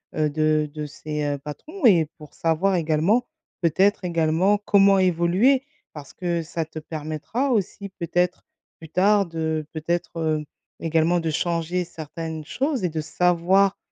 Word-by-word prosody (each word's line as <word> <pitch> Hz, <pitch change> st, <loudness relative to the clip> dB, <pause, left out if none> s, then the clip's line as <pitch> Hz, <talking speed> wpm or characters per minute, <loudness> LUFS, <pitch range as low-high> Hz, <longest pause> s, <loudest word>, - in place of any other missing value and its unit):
heu, 155 Hz, -1 st, +2 dB
de 155 Hz, 0 st, +1 dB
de 150 Hz, -1 st, -4 dB
ces, 150 Hz, +1 st, -5 dB
heu, 145 Hz, -1 st, -1 dB
patrons 270 Hz, -, -6 dB
et 170 Hz, -9 st, +6 dB
pour 150 Hz, -1 st, -13 dB
savoir 175 Hz, +4 st, +1 dB
également 170 Hz, +10 st, +2 dB, 0.3 s
peut-être 185 Hz, +4 st, +2 dB
également 170 Hz, +4 st, +2 dB
comment 200 Hz, -1 st, +5 dB
évoluer 185 Hz, +9 st, +3 dB, 0.3 s
parce 145 Hz, -3 st, -10 dB
que 175 Hz, -2 st, -2 dB
ça 165 Hz, 0 st, -4 dB
te 160 Hz, 0 st, -8 dB
permettra 155 Hz, -, -3 dB
aussi 200 Hz, -2 st, -1 dB
peut-être, 175 Hz, +1 st, 0 dB, 0.4 s
plus 160 Hz, -, -11 dB
tard, 200 Hz, +3 st, +3 dB
de 160 Hz, -1 st, -2 dB
peut-être, 170 Hz, +2 st, -3 dB
heu, 155 Hz, -1 st, 0 dB, 0.4 s
également 165 Hz, +2 st, +2 dB
de 165 Hz, -1 st, -2 dB
changer 170 Hz, +2 st, -1 dB
certaines 160 Hz, -1 st, -7 dB
choses 270 Hz, -, -2 dB
et 180 Hz, -, +1 dB
de 160 Hz, 0 st, -4 dB
savoir, 180 Hz, +5 st, +2 dB
170 Hz, 145 wpm, -24 LUFS, 155-190 Hz, 0.4 s, et